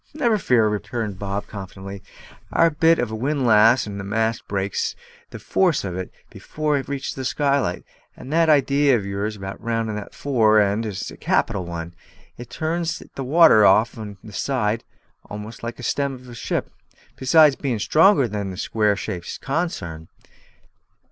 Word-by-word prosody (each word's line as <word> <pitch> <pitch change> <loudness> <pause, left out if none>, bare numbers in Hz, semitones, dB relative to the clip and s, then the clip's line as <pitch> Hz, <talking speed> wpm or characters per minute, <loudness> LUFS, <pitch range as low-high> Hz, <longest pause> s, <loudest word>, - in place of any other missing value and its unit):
"Never 235 -8 +2
fear," 120 - +3
returned 105 -1 -3
Bob 100 0 -3
confidently. 100 -1 -9 0.5
"Our 165 - +4
bit 165 +2 +4
of 120 -2 -2
a - - -3
windlass 120 -2 +3
and 100 -1 -6
the - - -5
mast 110 +3 -1
breaks 100 -1 -2 0.3
the - - -8
force 180 -4 +1
of 90 -3 -4
it 95 0 -5 0.2
before 150 -1 -2
it 135 - -2
reaches 140 -1 -4
the 130 - -6
skylight. 140 +1 0 0.3
And 135 - -8
that 165 0 +3
idee 140 -1 +4
of 110 -5 +1
yours 100 +2 -3
in 100 - -11
having 95 0 -7
it - - -20
rounded 115 -2 -2
at 105 - -7
the - - -17
fore 110 -6 +3
end 105 +2 +1
is 100 -3 -5
a - - -12
capital 95 -3 0
one; 85 0 -6 0.4
it 120 -1 -10
turns 165 +3 -2
the 135 - -5
water 150 -5 +6
off 110 +4 +4
each 105 -1 -10
side 115 -5 -1 0.5
almost 105 +2 -8
like 115 0 -5
the 125 - -11
stem 140 +2 -1
of 125 0 -14
a 120 - -10
ship, 115 - -3 0.4
besides 150 +2 +5
bein' 130 -5 -2
stronger 155 - +4
than 100 -2 -4
a 90 - -8
square 105 0 +1
shaped 95 -3 -6
consarn. 85 - -3
115 Hz, 175 wpm, -22 LUFS, 100-140 Hz, 0.5 s, water